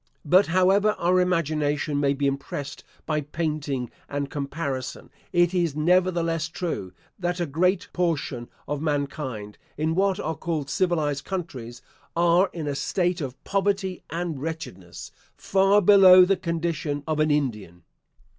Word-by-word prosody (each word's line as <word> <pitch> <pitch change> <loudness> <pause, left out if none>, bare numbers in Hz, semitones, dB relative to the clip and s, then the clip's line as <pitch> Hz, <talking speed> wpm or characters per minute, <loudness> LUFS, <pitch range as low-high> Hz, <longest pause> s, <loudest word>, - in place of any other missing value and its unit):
But, 185 +6 +5
however 190 +5 +3
our 180 +2 +2
imagination 150 -4 0
may 140 -1 +2
be 140 +1 -1
impressed 140 +1 -4 0.2
by 155 -1 0
painting 145 -4 -3 0.2
and 140 -1 -3
comparison, 140 -3 -4 0.2
it 175 0 +3
is 170 -5 0
nevertheless 165 0 +1
true, 165 - -4 0.3
that 175 0 -2
a 175 - 0
great 180 +6 +1
portion 150 -8 -2 0.2
of 145 0 -3
mankind, 140 -8 -3 0.2
in 155 +2 0
what 190 +1 +1
are 160 - -2
called 155 -4 -3
civilised 155 -7 0
countries, 130 -11 -6 0.3
are 175 +3 +4
in 165 -3 -5
a 145 - -1
state 175 +4 -1
of 130 -2 -6
poverty 195 -1 -1
and 165 -4 -3
wretchedness, 140 - -7 0.3
far 195 +1 +3
below 185 -2 +8
the 195 +2 +2
condition 165 -4 -2
of 155 -1 -1
an 155 0 +3
Indian. 105 - -2
160 Hz, 135 wpm, -25 LUFS, 140-180 Hz, 0.3 s, below